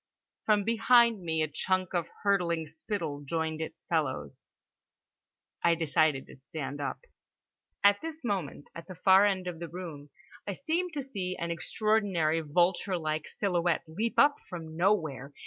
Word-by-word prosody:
From 210 Hz, -2 st, +4 dB
behind 230 Hz, 0 st, +4 dB
me 160 Hz, -2 st, 0 dB
a -, -, 0 dB
chunk 185 Hz, +5 st, -1 dB
of 170 Hz, -2 st, 0 dB, 0.2 s
hurtling 175 Hz, -5 st, +1 dB
spittle 160 Hz, -1 st, -4 dB
joined 160 Hz, +1 st, -2 dB
its 160 Hz, -, -6 dB
fellows. 130 Hz, -, -2 dB, 1.2 s
I 170 Hz, 0 st, +5 dB
decided 155 Hz, -3 st, +2 dB
to -, -, -14 dB
stand 140 Hz, +1 st, -6 dB
up. 140 Hz, -, -3 dB, 0.8 s
At 200 Hz, 0 st, +5 dB
this 320 Hz, -1 st, -7 dB
moment, 190 Hz, -, -3 dB
at 165 Hz, -, -9 dB
the 185 Hz, -, -8 dB
far 190 Hz, +3 st, +6 dB
end 190 Hz, -2 st, -1 dB
of 175 Hz, -2 st, -5 dB
the 170 Hz, -1 st, -6 dB
room, 165 Hz, -5 st, -8 dB, 0.4 s
I 200 Hz, -, -1 dB
seemed 330 Hz, -, -2 dB
to 285 Hz, -2 st, -3 dB
see 185 Hz, -8 st, -4 dB
an 170 Hz, 0 st, -2 dB
extraordinary 180 Hz, -4 st, +1 dB
vulture 175 Hz, +4 st, +1 dB
like 155 Hz, -1 st, -2 dB
silhouette 175 Hz, -4 st, 0 dB
leap 215 Hz, +9 st, -2 dB
up 290 Hz, 0 st, +6 dB
from 160 Hz, -3 st, -7 dB
nowhere. 160 Hz, -7 st, 0 dB
175 Hz, 150 wpm, -30 LUFS, 160-205 Hz, 1.2 s, far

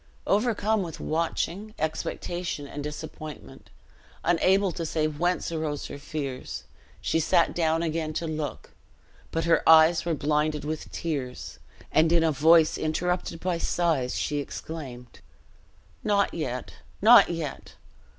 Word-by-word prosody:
Overcome 215 Hz, 0 st, +1 dB
with 170 Hz, -4 st, -6 dB
watching, 170 Hz, +6 st, -2 dB
expectation, 160 Hz, 0 st, -3 dB
and 145 Hz, +1 st, -6 dB
disappointment, 150 Hz, 0 st, -8 dB, 0.5 s
unable 185 Hz, +3 st, +3 dB
to 170 Hz, -, -4 dB
say 155 Hz, -1 st, 0 dB
whence 170 Hz, +4 st, -1 dB
arose 155 Hz, -3 st, -3 dB
her 140 Hz, -, -7 dB
fears, 140 Hz, -3 st, -5 dB, 0.4 s
she 165 Hz, -, +1 dB
sat 165 Hz, +1 st, +3 dB
down 165 Hz, -1 st, +1 dB
again 160 Hz, -1 st, -1 dB
to 165 Hz, -, -2 dB
look; 155 Hz, -3 st, -4 dB, 0.6 s
but 165 Hz, -, -1 dB
her 170 Hz, 0 st, +4 dB
eyes 160 Hz, +1 st, +7 dB
were 170 Hz, -2 st, 0 dB
blinded 150 Hz, +1 st, 0 dB
with 155 Hz, 0 st, -4 dB
tears, 140 Hz, -7 st, -4 dB, 0.3 s
and 160 Hz, +1 st, +4 dB
in 170 Hz, -1 st, +4 dB
a 160 Hz, -, +3 dB
voice 160 Hz, +2 st, +5 dB
interrupted 170 Hz, +2 st, -1 dB
by 180 Hz, -2 st, -1 dB
sighs 160 Hz, -8 st, 0 dB
she 145 Hz, -1 st, -1 dB
exclaimed, 135 Hz, -5 st, -7 dB, 0.8 s
"Not 200 Hz, -2 st, +2 dB
yet, 130 Hz, -6 st, -4 dB, 0.2 s
not 230 Hz, +4 st, +8 dB
yet! 165 Hz, -5 st, -5 dB
160 Hz, 130 wpm, -27 LUFS, 150-170 Hz, 0.8 s, not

